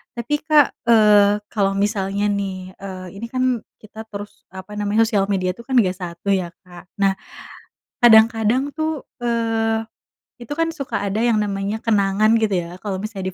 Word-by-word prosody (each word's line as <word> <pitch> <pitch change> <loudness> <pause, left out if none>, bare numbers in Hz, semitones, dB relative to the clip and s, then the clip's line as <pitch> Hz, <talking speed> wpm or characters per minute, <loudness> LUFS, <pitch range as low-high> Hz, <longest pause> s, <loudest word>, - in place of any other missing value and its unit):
tapi 240 +5 -2
Kak, 305 -3 +4 0.2
eee, 210 -2 +5
kalau 195 -2 0
misalnya 200 0 0
nih, 190 -2 -4
eee, 185 -2 -7
ini 230 - -5
kan 255 -1 0 0.2
kita 220 +1 -11
terus 205 -1 -10
apa 190 +2 -10
namanya 210 +2 +2
sosial 200 -3 +1
media 185 -2 0
itu 235 - -12
kan 260 - -2
nggak 185 -4 +1
satu 180 +3 -4
ya 185 -3 +1 0.2
Kak 180 -1 -14
nah 195 -1 +4 0.9
kadang-kadang 230 +3 +4
tuh, 315 -2 -2 0.2
eee, 225 -1 0 0.6
itu 240 +5 -5
kan 330 +1 0
suka 275 - -4
ada 200 +1 -2
yang 235 -2 +2
namanya 200 +1 -3
kenangan 210 0 +2
gitu 220 -3 0
ya 175 +2 -9
kalo 195 -2 -4
misalnya 195 -3 -4
210 Hz, 160 wpm, -21 LUFS, 195-230 Hz, 0.9 s, eee